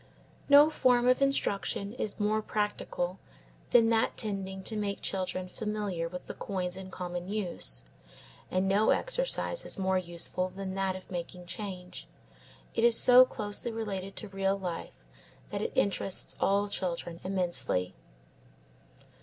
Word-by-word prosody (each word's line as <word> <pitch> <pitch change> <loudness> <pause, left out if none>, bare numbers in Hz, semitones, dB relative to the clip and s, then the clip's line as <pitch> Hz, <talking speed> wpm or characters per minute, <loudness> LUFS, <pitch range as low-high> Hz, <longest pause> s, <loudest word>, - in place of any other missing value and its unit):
No 290 +2 +8
form 250 -4 +3
of 255 +2 +4
instruction 205 -6 +1
is 220 -5 -4
more 215 +1 +2
practical 220 - -2 0.5
than 230 -2 +5
that 225 0 +2
tending 190 -3 -3
to 220 - -1
make 205 -1 -2
children 185 -1 -2
familiar 205 -4 -3
with 180 +2 -7
the - - -6
coins 180 -3 -3
in 190 0 -8
common 180 0 -5
use, 175 - -2 0.7
and 185 +1 +1
no 205 +3 +3
exercise - - +2
is - - -3
more 190 -1 +2
useful 175 +1 -1
than 190 0 -5
that 190 -1 0
of 185 +1 -10
making 180 0 -5
change. 180 0 -6 0.7
It 225 - 0
is 235 -1 +6
so 250 +1 +8
closely 215 0 -4
related 195 -4 -4
to 215 - -4
daily 195 0 0
life 175 - -6 0.4
that - - -3
it - - -1
interests 195 -1 0
all 200 +1 +3
children 175 -3 -3
intensely. 175 - 0
195 Hz, 140 wpm, -30 LUFS, 185-215 Hz, 0.7 s, No